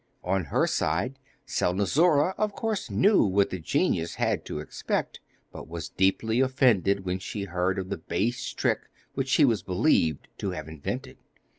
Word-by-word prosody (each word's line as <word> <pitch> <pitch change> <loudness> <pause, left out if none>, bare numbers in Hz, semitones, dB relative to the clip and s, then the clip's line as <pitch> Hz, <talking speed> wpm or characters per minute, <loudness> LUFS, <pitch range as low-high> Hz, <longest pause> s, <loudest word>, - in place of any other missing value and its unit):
On 95 -1 0
her - - +1
side, 105 - -1 0.3
Selnozoura 145 - +2
of 210 -1 -1
course 220 -1 -2
knew 205 +1 +4
what 100 0 +2
the 95 - -3
genius 80 +1 0
had - - 0
to - - -5
expect, 75 - -3 0.3
but - - -9
was 85 +1 -6
deeply 110 +5 +1
offended 115 -7 +3
when 90 +1 -1
she 100 +1 -5
heard 90 0 -1
of 95 -1 -4
the - - -3
base 120 +4 -1
trick - - -1 0.2
which 135 -1 -2
she 145 +2 +5
was 115 -7 +2
believed 90 - +1
to 100 - -2
have 80 -5 -5
invented. 80 -2 -6
100 Hz, 160 wpm, -27 LUFS, 90-130 Hz, 0.3 s, she